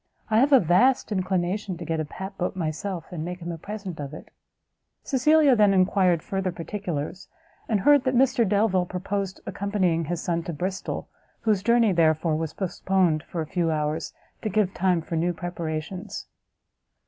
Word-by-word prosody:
I 220 - +5
have 275 +4 +4
a 270 - +8
vast 200 +10 +3
inclination 185 0 -1
to 170 - -7
get 160 0 -1
a 155 - -1
pap 190 +6 -7
boat 180 0 -2
myself, 175 +2 -3
and 165 -3 -4
make 180 +2 -5
him 175 0 -5
a 165 - -6
present 200 -3 -6
of 145 +1 -6
it." - - -12 0.7
Cecilia 290 +1 +4
then 205 -3 +4
enquired 185 -3 +3
further 190 -1 -2
particulars, 175 -2 -5 0.4
and 210 -4 +2
heard 290 +3 +5
that 255 0 +1
Mr 255 -1 +4
Delvile 200 -3 +2
purposed 190 +1 -3
accompanying 185 -5 0
his 170 +2 -2
son 170 -1 -1
to 170 - -4
Bristol, 185 +5 -4 0.3
whose 215 -4 +2
journey, 235 0 +4
therefore, 160 -2 +2
was 160 -1 -2
postponed 185 -3 +1
for 165 - -5
a - - -3
few 170 +1 -1
hours 155 +1 -1 0.3
to 215 - -2
give 205 -2 +1
time 180 -3 +1
for 165 - -4
new 175 +2 +1
preparations. 175 +3 -5
185 Hz, 170 wpm, -25 LUFS, 165-205 Hz, 0.7 s, a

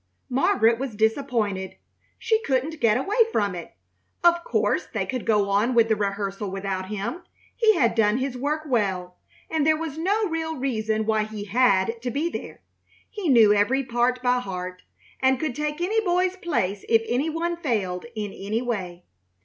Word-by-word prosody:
Margaret 250 - +3
was 260 -5 -4
disappointed. 220 -5 0 0.4
She 445 -1 +1
couldn't 290 - -1
get 230 -1 +3
away 390 - -2
from 205 - 0
it. 175 -2 -8 0.5
Of 345 0 +4
course - - 0
they - - -1
could 255 -3 -4
go 210 -3 +3
on 220 +5 +2
with 230 -1 +4
the 220 - +3
rehearsal 200 0 -2
without 190 -1 -3
him. 215 - -4 0.3
He 440 -2 +4
had 235 -4 +3
done 220 -1 +3
his 260 0 -2
work 295 +5 -2
well, 190 -9 -1 0.3
and 320 -2 0
there 310 +1 +3
was 315 -1 -5
no 410 +5 +1
real 320 -1 -3
reason 220 -5 -1
why 215 -1 +1
he 215 -1 -7
had 230 0 +2
to 250 - -2
be 300 +7 -1
there. - - -7 0.5
He 410 -7 -3
knew 225 -5 +7
every 245 +7 +2
part 250 0 0
by 250 0 +3
heart, 185 -4 -6 0.4
and 265 -1 +3
could 310 -5 -2
take 300 +1 -3
any 430 +6 +1
boy's 365 0 +1
place 205 - -2
if 225 -1 +4
any 270 +6 0
one 335 +2 -2
failed 215 - -2
in 210 -2 -4
any 215 +5 -3
way. 185 -7 -4
240 Hz, 175 wpm, -24 LUFS, 205-305 Hz, 0.5 s, knew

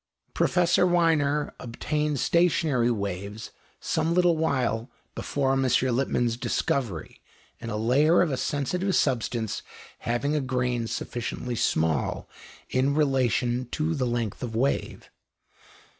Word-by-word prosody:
Professor 175 0 +3
Wiener 155 -4 +2
obtained 150 +4 -2
stationary 155 -8 +2
waves 100 0 -4 0.3
some 160 +1 0
little 175 -2 +4
while 130 -7 0 0.2
before 135 -2 -1
M. 135 - +1
Lippmann's 125 -2 +1
discovery, 115 - -2 0.4
in 115 - -6
a 105 - -2
layer 145 +10 +4
of 165 - -1
a - - 0
sensitive 180 +9 -1
substance 115 -4 0 0.4
having 130 +6 -1
a 150 - +1
grain 125 -3 -1
sufficiently 120 +1 -4
small 80 -8 0 0.4
in 135 +2 +2
relation 130 -4 +1
to 155 +2 0
the 130 -5 -1
length 120 -4 -2
of 115 -3 -4
wave. 135 +5 -1
130 Hz, 115 wpm, -26 LUFS, 120-150 Hz, 0.4 s, little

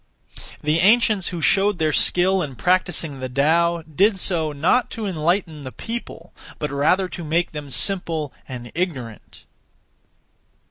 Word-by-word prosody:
The 150 +2 +1
ancients 215 0 +3
who 170 -3 -4
showed 195 +1 +3
their 155 -2 0
skill 185 +1 +3
in 140 -6 -5
practising 175 -4 0
the 130 0 -5
Tao 165 +5 +1
did 190 +7 +1
so, 165 -5 +1
not 165 - +1
to 220 - -3
enlighten 170 -2 -1
the 130 -2 -7
people, 235 - -8 0.2
but 150 -2 -4
rather 155 +7 +2
to 175 - -7
make 165 +3 0
them 150 -2 -7
simple 165 -3 0 0.2
and 120 -2 -8
ignorant. 135 - -5
170 Hz, 140 wpm, -21 LUFS, 150-190 Hz, 0.2 s, ancients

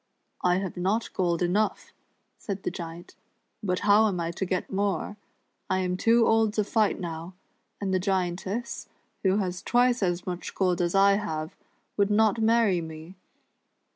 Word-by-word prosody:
"I 180 0 +4
have 190 -2 -4
not 195 +6 -1
gold 175 -2 0
enough," 205 +5 0 0.5
said 200 -2 -5
the - - -1
Giant; 170 0 -8 0.5
"but 185 -4 -1
how 210 +2 +5
am 190 -4 -2
I 165 0 -2
to 180 +3 -3
get 180 -1 -2
more. 200 0 -1 0.3
' - - -48
I 185 - +2
am 180 -1 -1
too 230 +4 +4
old 225 -1 +3
to 215 - +2
fight 215 0 +1
now, 170 0 -6 0.4
and 195 -2 -2
the 185 - +2
Giantess, 190 +4 -2 0.3
who 190 0 +2
has 180 -3 -2
twice 245 0 +2
as 175 -2 0
much 180 -1 -5
gold 180 -2 +1
as 175 +1 0
I 195 0 +5
have, 160 -6 -4 0.4
would 200 0 +3
not 220 +1 +3
marry 220 -5 +3
me. 160 +2 -9
190 Hz, 170 wpm, -27 LUFS, 175-210 Hz, 0.5 s, how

